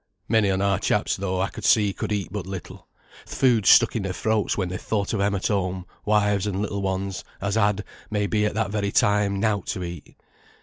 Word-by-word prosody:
Many 110 -3 +3
on 95 0 +1
our 100 -1 +2
chaps - - +1
though, 95 -1 -2
I 95 +1 0
could - - -10
see, 105 -3 +4
could - - -4
eat 100 -3 -1
but 100 -3 -5
little. 95 -2 -8 0.4
Th' - - -8
food 120 -6 +3
stuck - - +6
in 110 - 0
their 95 -1 -3
throats 110 +1 0
when 95 -3 -1
they 90 - -4
thought 105 -1 -2
o' - - 0
them 100 +1 +1
at 95 - -3
home, 95 -2 -1 0.2
wives 105 -1 +2
and 100 -2 -2
little 100 -1 -2
ones, 95 0 -2 0.2
as 100 0 -2
had, 105 -1 +2 0.3
may 105 -1 0
be 105 +2 +1
at - - -4
that 110 -2 -1
very 100 -1 -1
time, 100 -1 +2
nought 105 -2 0
to 90 - -3
eat. 85 -3 -8
100 Hz, 225 wpm, -24 LUFS, 95-105 Hz, 0.4 s, stuck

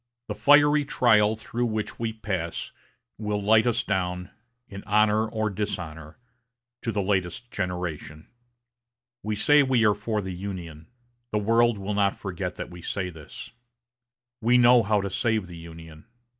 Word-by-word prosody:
The - - -1
fiery 145 +1 +5
trial 110 -6 +3
through 120 +2 -3
which 110 -1 -4
we 115 -1 -1
pass 95 -6 -4 0.5
will 105 -1 -2
light 110 +3 +4
us 120 0 +1
down, 90 -2 -2 0.4
in 100 0 -9
honor 105 +1 +3
or 110 -1 -2
dishonor, 85 -6 -5 0.6
to 115 - -2
the 100 -2 -1
latest 95 +4 -2
generation. 90 -4 -4 1.0
We 105 0 -2
say 145 +8 +5
we 130 -4 +2
are 105 - +5
for 105 +1 -3
the 95 0 -5
Union. 90 -4 -7 0.4
The 105 - 0
world 115 +2 +3
will 100 +1 -4
not 100 -1 +1
forget 90 -2 -5
that - - -7
we 90 0 -10
say 90 +1 -3
this. 80 -3 -11 0.9
We 120 +3 +4
know 120 0 +6
how 105 -1 +1
to 100 - -3
save 110 -2 0
the 90 -1 -11
Union. 80 -1 -12
105 Hz, 155 wpm, -26 LUFS, 90-110 Hz, 1.0 s, know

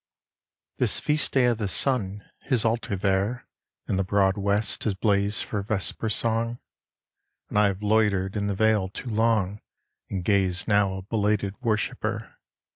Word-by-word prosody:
This - - +2
feast 150 +1 +1
day 130 -2 +4
of 120 -2 +1
the 105 - -1
sun, 100 +2 0 0.2
his 125 -5 0
altar 115 -1 0
there 100 +5 0 0.4
In 95 - 0
the 95 - +1
broad 95 0 +2
west 100 +1 -1
has 105 -4 0
blazed 100 0 +1
for 105 - -3
vesper 105 +2 -2
song; 115 +2 +1 0.9
And 105 - +1
I 105 - +5
have 100 +1 -3
loitered 105 -3 +2
in 100 -1 -1
the 100 - -1
vale 110 -2 +2
too 120 +5 -7
long 110 -3 +1 0.5
And 95 -3 -4
gaze 95 -3 +1
now 100 -3 +3
a - - -5
belated 105 -1 0
worshipper. 110 -3 -2
105 Hz, 155 wpm, -26 LUFS, 95-110 Hz, 0.9 s, I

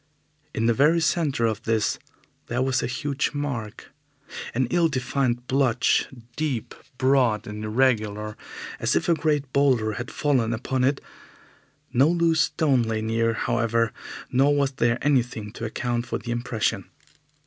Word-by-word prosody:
In 115 - 0
the 115 - +4
very 150 +7 +4
centre 155 -6 +1
of 110 -2 -1
this 110 -2 0 0.5
there 120 +2 0
was 130 0 +1
a - - -1
huge 140 +3 -2
mark 125 -8 -5 0.6
an 130 +1 +2
ill 175 -1 +3
defined 125 -2 -1
blotch, 130 -3 +2 0.3
deep, 145 -8 -2 0.2
broad 130 -5 +2
and 105 0 -6
irregular, 110 -2 0 0.4
as - - +1
if - - +1
a 170 - +5
great 150 -4 -1
boulder 130 -6 +3
had 120 +4 -5
fallen 130 -6 +1
upon 125 +3 -1
it. 140 +2 +1 0.9
No 135 +4 +5
loose 165 -1 +3
stone 145 -8 +2
lay 110 -1 -2
near, 115 +1 +1
however, 115 -1 0 0.4
nor 140 +3 +4
was 140 -1 +1
there 120 -2 +1
anything 125 -7 0
to 115 - -6
account 120 +1 -2
for - - -2
the 120 - -6
impression. 120 -5 -1
125 Hz, 150 wpm, -25 LUFS, 115-140 Hz, 0.9 s, a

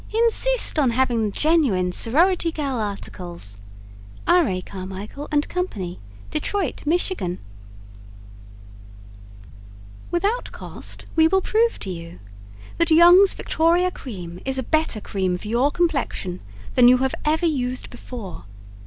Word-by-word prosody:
Insist 465 -3 +3
on 275 -4 +3
having 235 -2 +1
the - - -7
genuine 260 - +2
"Sorority 335 - +3
Girl" 280 -5 -3
articles. 175 - -5 0.7
R. 350 -3 +4
A. 185 -3 -2
CARMICHAEL 195 +9 -8
& - - -7
CO., 205 - -3 0.3
Detroit, 335 +1 -2
Michigan 330 - -1 2.7
Without 405 +8 -1
Cost, - - -9
We 320 0 +5
will 385 +3 +2
prove 455 +4 +1
to 195 - -5
you 170 -1 -8 0.6
That 335 -1 +3
Young's 350 +4 +7
Victoria 345 +3 +1
Cream 180 - -8
is 265 0 -1
a 260 - -1
better 310 -7 0
cream 185 -3 -2
for 210 - -10
your 245 +5 +2
complexion 275 - -1 0.3
than 245 -1 +6
you 250 +1 +7
have 265 +1 -1
ever 315 +3 +1
used 255 -5 -2
before. 215 - -9
265 Hz, 125 wpm, -22 LUFS, -, 2.7 s, Young's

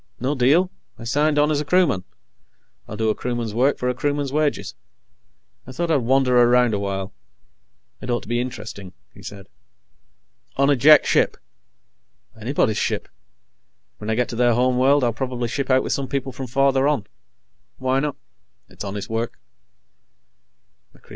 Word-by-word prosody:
"No 130 +4 -1
deal. 150 +8 +3 0.3
I - - -11
signed 145 +5 +1
on 150 +1 +3
as 150 -1 +1
a - - -5
crewman. 145 - +2 0.8
I'll 105 - -7
do 110 0 +1
a - - 0
crewman's 120 -3 -4
work 130 +5 +2
for 125 - -2
a 125 - +1
crewman's 145 +1 -2
wages. 150 -1 -1 0.9
I - - -8
thought 170 +5 -2
I'd 155 - +4
wander 125 0 +3
around 120 -1 +4
a 100 - 0
while. 100 -1 -4 0.9
It - - -7
ought 120 0 0
to - - -14
be 120 +1 0
interesting," 110 -6 -7 0.2
he - - -15
said. 100 -1 -9 1.1
"On 140 +1 +3
a - - +4
Jek 150 +4 +6
ship." - - +2 1.0
"Anybody's 110 -1 0
ship. - - -2 0.9
When 105 - -6
I 110 - +1
get 125 +1 0
to - - -5
their 120 0 +3
home 125 +1 +2
world, 140 +2 +4
I'll 120 -1 +1
probably 125 0 -3
ship 140 +2 -3
out 130 0 +4
with - - -1
some 135 -1 -2
people 135 0 -3
from 130 +1 -7
farther 135 +2 +2
on. 145 -9 0 0.7
Why 130 +1 0
not? 145 0 -2 0.5
It's - - -9
honest 100 0 -5
work." 115 +1 -3
125 Hz, 165 wpm, -22 LUFS, 115-140 Hz, 1.1 s, Jek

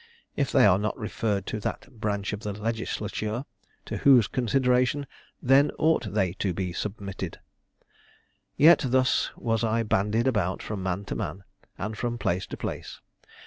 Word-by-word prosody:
If 140 -2 0
they 130 -4 +6
are 95 -1 +5
not 105 +1 -2
referred 105 -2 -2
to 110 - -3
that 110 +3 -6
branch 100 -1 -2
of 105 - -3
the 105 -1 -4
legislature, 110 +2 -3 0.4
to - - -4
whose 130 -6 +6
consideration 125 +3 +1 0.4
then 135 +3 +5
ought 120 -11 +1
they 95 -4 +1
to 95 -4 0
be 90 -1 -3
submitted? 100 0 -5 1.2
Yet 160 +2 +7
thus 130 +1 +2
was 115 -1 0
I 115 0 +1
bandied 105 +2 +1
about 105 -8 0
from 105 -3 -4
man 95 +2 -2
to - - -4
man, 95 +2 -4 0.3
and 110 +2 -4
from 120 +2 -2
place 90 -3 -1
to - - -7
place. - - -6
110 Hz, 155 wpm, -27 LUFS, 100-125 Hz, 1.2 s, Yet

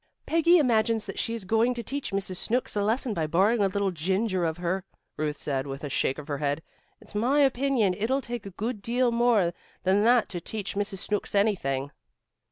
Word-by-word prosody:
"Peggy 335 +2 +4
imagines 230 -6 +2
that 195 - -5
she's 230 -2 -2
going 225 +5 +2
to 235 - -4
teach 280 +4 -3
Mrs. 195 -2 -2
Snooks 245 +4 -1
a 205 - +1
lesson 225 +3 0
by 160 -5 -1
borrowing 200 +8 +3
a 200 - +4
little 195 0 0
ginger 185 +2 0
of 160 0 -1
her," 180 +2 -1 0.3
Ruth 150 -1 -2
said 135 -1 -2
with 135 +1 -6
a 145 - -3
shake 130 - 0
of 150 -1 -8
her 145 -2 -3
head. 145 +2 -1 0.4
"It's - - -15
my 250 +8 +2
opinion 265 -7 +2
it'll 230 +7 0
take 240 -5 -6
a 190 - -12
good 220 0 -3
deal 240 +3 +1
more 235 -7 +3 0.3
than 195 +2 +3
that 240 -1 +4
to 175 - -4
teach 205 +2 -4
Mrs. 200 0 -2
Snooks 210 -1 -2
anything." 145 -10 +1
205 Hz, 200 wpm, -27 LUFS, 175-235 Hz, 0.4 s, Peggy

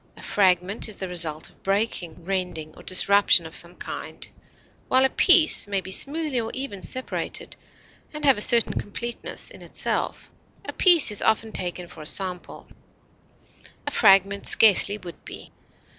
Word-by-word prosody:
A - - -13
fragment 190 +2 +1
is 215 - -8
the 190 - -6
result 165 -3 -2
of - - -22
breaking, 195 -4 -3
rending, 180 -4 -4
or - - -14
disruption 195 -1 +3
of 160 - -10
some 175 +1 -2
kind, - - -8 0.6
while 260 +1 +3
a - - +2
piece 335 - +4
may 200 -1 -1
be 190 0 -9
smoothly 285 +3 0
or 225 - -5
evenly 260 -7 -6
separated 255 +5 -5 0.6
and 300 -1 -6
have 270 -2 +5
a 210 - -3
certain 235 +1 +3
completeness 235 +3 -6
in - - -14
itself. - - -4 0.3
A - - -7
piece 345 - +5
is 210 - +1
often 220 0 0
taken 180 -2 -4
for 165 - -13
a 150 - -6
sample; 180 -1 -2 1.2
a 290 - -3
fragment 200 -4 +3
scarcely 205 -1 +5
would 175 -4 -12
be. - - -11
200 Hz, 160 wpm, -23 LUFS, 180-235 Hz, 1.2 s, have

